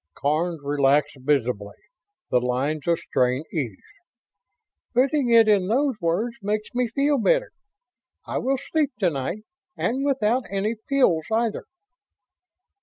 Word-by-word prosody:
Karns 155 +3 -1
relaxed 145 0 +2
visibly; 125 -7 -1 0.6
the 125 - +4
lines 135 +5 -2
of 170 -1 +3
strain 130 0 0
eased. 125 - -2 1.2
"Putting 265 +1 +2
it 230 -1 +6
in 200 -4 +3
those 265 +6 +2
words 200 +8 -1
makes 210 +1 -2
me 245 0 +1
feel 280 +4 +1
better. - - +2 0.7
I - - -2
will 270 +1 0
sleep 300 +1 -1
to 190 -6 +2
night 160 +9 -4 0.3
and 260 +4 -1
without 255 -3 +1
any 200 +3 -1 0.2
pills, 220 - +3
either." 225 0 0
200 Hz, 125 wpm, -24 LUFS, -, 1.2 s, it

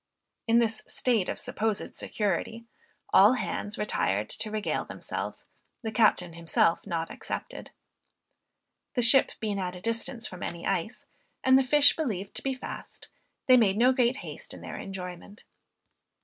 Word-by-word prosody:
In 230 +1 +4
this 225 -2 +2
state 230 -7 +2
of - - -3
supposed 215 -1 -1
security, 215 +3 -2 0.5
all 205 +5 +7
hands 210 -4 -3
retired 105 - -1
to 215 - -2
regale 215 -1 -2
themselves, - - -5 0.4
the 220 - -3
captain 210 -6 +2
himself 165 0 +2
not 165 -3 -3
excepted. - - -6 1.3
The 245 - +2
ship 265 +3 +5
being 210 -3 -2
at 180 -1 -3
a - - -8
distance 230 +3 -1
from 180 0 -7
any 170 0 -5
ice, 195 +5 -2 0.4
and 260 0 +5
the 265 - +5
fish 285 +2 +5
believed 210 - -3
to - - -3
be 270 -1 -2
fast, 255 - -9 0.4
they 255 -1 +7
made 210 -4 +3
no 250 +3 +5
great 250 0 +2
haste - - -8
in - - -12
their - - -7
enjoyment. 190 +1 -8
215 Hz, 150 wpm, -28 LUFS, 185-240 Hz, 1.3 s, all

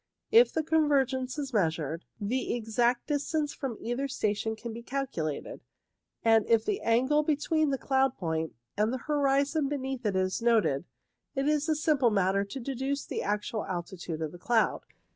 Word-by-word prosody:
If 465 +3 +7
the 320 - 0
convergence 275 -4 +1
is 275 -3 -4
measured, 165 -4 0
the 235 +4 -1
exact 240 +1 +1
distance 295 0 -1
from 255 -6 -4
either 245 +4 -2
station 220 -3 -1
can 230 +1 -7
be 235 - -7
calculated, 235 - -4 0.6
and 225 -1 +5
if 230 -1 +3
the 405 - -1
angle 260 +6 +3
between 305 +1 +1
the 270 - 0
cloud 265 -1 +1
point 160 - -2 0.2
and 210 +2 +1
the 260 - -1
horizon 285 0 +2
beneath 265 -2 -3
it 205 -3 0
is 185 +3 0
noted, 210 -11 +2 0.5
it 275 +1 0
is 300 +1 +1
a 310 - +3
simple 295 -5 +3
matter 195 -1 +2
to 200 +7 -7
deduce 270 +2 -3
the - - -3
actual 210 +2 -2
altitude 175 -2 -4
of 155 - -3
the 175 - -12
cloud. 225 +4 +2
245 Hz, 165 wpm, -29 LUFS, 205-280 Hz, 0.6 s, If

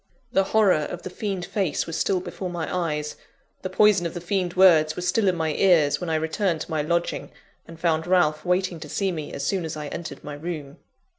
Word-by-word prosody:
The 195 - +3
horror 210 -2 +4 0.2
of 175 - -7
the 185 - -6
fiend 195 -3 -3
face 190 -8 -1
was 165 - -5
still 185 +4 +1
before 185 0 -5
my 175 -1 -3
eyes, 150 -4 -2 0.4
the 185 - -4
poison 195 -2 +4
of 170 - -9
the - - -3
fiend 180 0 -2
words 160 -5 +6
was 180 0 -3
still 200 +3 +2
in 185 - +3
my 160 -2 -1
ears, 160 -6 +3
when 175 - -3
I 160 - +1
returned 160 +2 0
to - - -6
my 155 -1 +1
lodging, 170 +3 -1 0.4
and 165 -1 -12
found 160 -1 +1
Ralph 155 -4 +3
waiting 180 -1 0
to - - -9
see 195 -2 0
me 155 -4 -5
as 140 - -4
soon 190 -3 0
as 160 -1 -5
I 150 -1 -5
entered 170 - -7
my 150 - -6
room. 150 -2 -6
175 Hz, 225 wpm, -24 LUFS, 155-185 Hz, 0.4 s, words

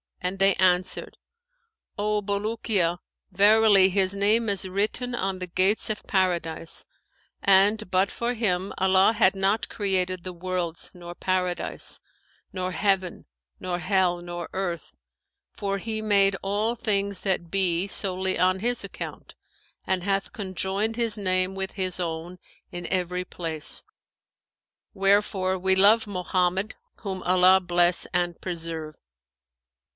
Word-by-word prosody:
and 180 +1 -3
they 195 0 +5
answered, 180 0 +1 0.8
'O 210 0 0
Bulukiya, 200 -3 0 0.3
verily 205 0 +6
his 190 0 +2
name 215 +3 +2
is 195 -1 -1
written 210 +6 -1
on 195 -5 -2
the 180 - -3
gates 190 +5 +1
of 210 - -4
Paradise; 170 -4 -1 0.6
and, 200 +2 +4
but 190 +1 +2
for 235 +1 -2
him, 195 -5 -1
Allah 190 +3 +4
had 205 -3 +3
not 195 +3 0
created 185 -3 -1
the 185 - -5
worlds[FN#516] 175 -1 -3
nor 175 0 -9
Paradise, 180 -1 -2 0.5
nor 185 -1 -3
heaven 190 0 0 0.3
nor 180 -1 -3
hell 180 -1 +1
nor 175 -1 -6
earth, 175 -4 -4 0.6
for 200 -1 -2
He 220 +1 -4
made 200 -2 +3
all 210 +4 -1
things 200 -4 -1
that 175 -4 -1
be, 185 -1 +1
solely 190 -1 -2
on 185 +1 +3
his 240 +4 0
account, - - -8 0.5
and 185 -1 0
hath 195 0 -1
conjoined 195 +2 -2
his 230 -2 0
name 185 -1 0
with 190 0 -4
His 185 -2 -3
own 170 +1 -4 0.3
in 175 -1 -6
every 180 -1 -1
place; 160 -4 -4 1.1
wherefore 195 -1 +1
we 190 +1 +2
love 210 +4 +5
Mohammed, 185 +1 -1 0.2
whom 190 -3 -5
Allah 185 +1 +5
bless 175 -1 +2
and 175 -1 0
preserve!' 165 -3 -5
190 Hz, 130 wpm, -25 LUFS, 180-200 Hz, 1.1 s, verily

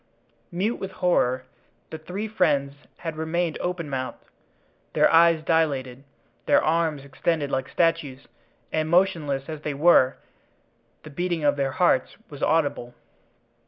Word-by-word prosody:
Mute 200 +7 -1
with 195 0 -6
horror, 130 -9 +1 0.5
the 160 - -6
three 185 +7 -5
friends 150 -10 +1 0.2
had 165 -2 -6
remained 160 +1 -2
open 180 -3 -3
mouthed, 130 -2 -5 0.7
their - - +3
eyes 165 -1 +5
dilated, 140 -6 0 0.4
their - - +5
arms 155 -3 0
extended 145 +1 -2
like 130 0 -2
statues, 165 -6 -1 0.4
and, 155 0 -1
motionless 160 -6 +1
as 155 -2 -6
they 150 -2 -4
were, 140 -4 +4 0.9
the 155 - -11
beating 175 +1 -2
of 145 -1 +3
their 135 -2 -1
hearts 175 -6 +1
was 145 -1 -10
audible. 140 -6 0
155 Hz, 130 wpm, -24 LUFS, 140-170 Hz, 0.9 s, eyes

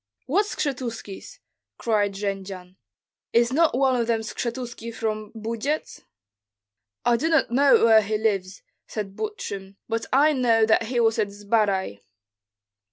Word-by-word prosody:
"What 390 +11 +1
Skshetuskis?" 250 - -5 0.4
cried 205 -3 +1
Jendzian. 195 -2 -5 0.6
"Is 235 +2 +3
not 315 -3 +3
one 265 -1 +3
of 235 -2 0
them 230 -1 +1
Skshetuski 235 +1 -5
from 215 -1 -3
Bujets?" 230 +7 -3 1.0
"I 240 - +4
do 320 +7 0
not 320 -7 +2
know 275 0 +5
where 220 -1 +7
he 215 +1 -1
lives," 200 -3 -1 0.2
said 200 -3 -5
Butrym, 200 - -5
"but 225 0 -2
I 295 +4 +5
know 230 -4 +3
that 220 +1 +3
he 245 0 -1
was 225 -1 +2
at 210 - +2
Zbaraj." 200 - 0
225 Hz, 135 wpm, -24 LUFS, 205-255 Hz, 1.0 s, where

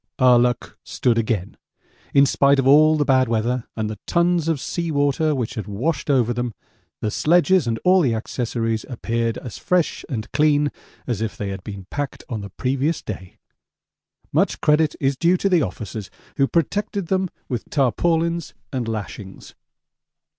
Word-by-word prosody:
Our 125 -2 +6
luck 120 -1 -1
stood 120 -2 +1
again. 110 -4 -2 0.5
In 140 0 +6
spite 140 +1 +3
of 135 - +1
all 155 +3 +6
the 145 - +1
bad 130 -2 +3
weather 115 +2 0
and 110 -1 -2
the 105 -1 -6
tons 170 -1 +2
of 160 -4 +1
sea 170 +5 -3
water 145 +1 +1
which 125 -2 -2
had 110 -6 -5
washed 130 +9 -2
over 125 -4 +3
them 120 -2 -3 0.5
the 105 - -1
sledges 175 - +3
and 115 -1 0
all 185 +1 +6
the 125 -8 +2
accessories 115 -1 -2
appeared 115 -2 -2
as 120 - -8
fresh 180 -3 0
and 110 -6 -4
clean 150 -1 +3 0.3
as 120 -4 -2
if 110 -2 -3
they 100 - -3
had 95 -1 -6
been 100 -2 -8
packed 145 -2 -4
on 110 -3 -3
the 100 - -7
previous 135 - -1
day 95 -3 -7 0.9
much - - +1
credit 150 0 +3
is 135 0 +1
due 170 +6 +3
to 195 - 0
the 180 -3 +4
officers 105 -2 -5 0.3
who 135 - +3
protected 200 +5 -1
them 190 -1 +1 0.2
with 120 -3 -4
tarpaulins 165 +5 0 0.2
and 125 -3 -2
lashings. 105 -3 -6
130 Hz, 170 wpm, -22 LUFS, 115-155 Hz, 0.9 s, Our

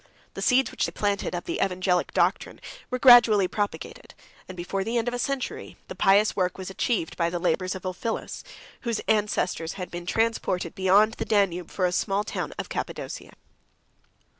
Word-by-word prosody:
The - - -6
seeds 260 +1 +3
which - - -1
they - - -6
planted, 200 -3 -1
of 175 - -4
the - - -1
evangelic 180 -1 0
doctrine, - - 0 0.3
were 255 - -1
gradually 235 -6 +7
propagated; 205 +2 -5 0.3
and 185 - -9
before 190 +3 -3
the 230 +4 -1
end 230 0 -1
of 245 - -1
a 245 - -3
century, 275 +1 -4
the - - -5
pious 200 +2 +4
work 180 -2 0
was 190 0 -6
achieved 190 -4 -1
by 170 -1 0
the 175 - -3
labors 185 +1 0
of 190 - -8
Ulphilas, 185 +5 -4 0.4
whose 235 -3 -2
ancestors 205 -6 0
had 180 -2 -7
been 175 0 -7
transported 225 -6 0
beyond 200 +4 +4
the - - -4
Danube 185 -5 +1
from 185 - -1
a 180 - +1
small 195 +3 0
town - - -4
of - - -4
Cappadocia. - - -6
195 Hz, 180 wpm, -26 LUFS, 180-225 Hz, 0.4 s, gradually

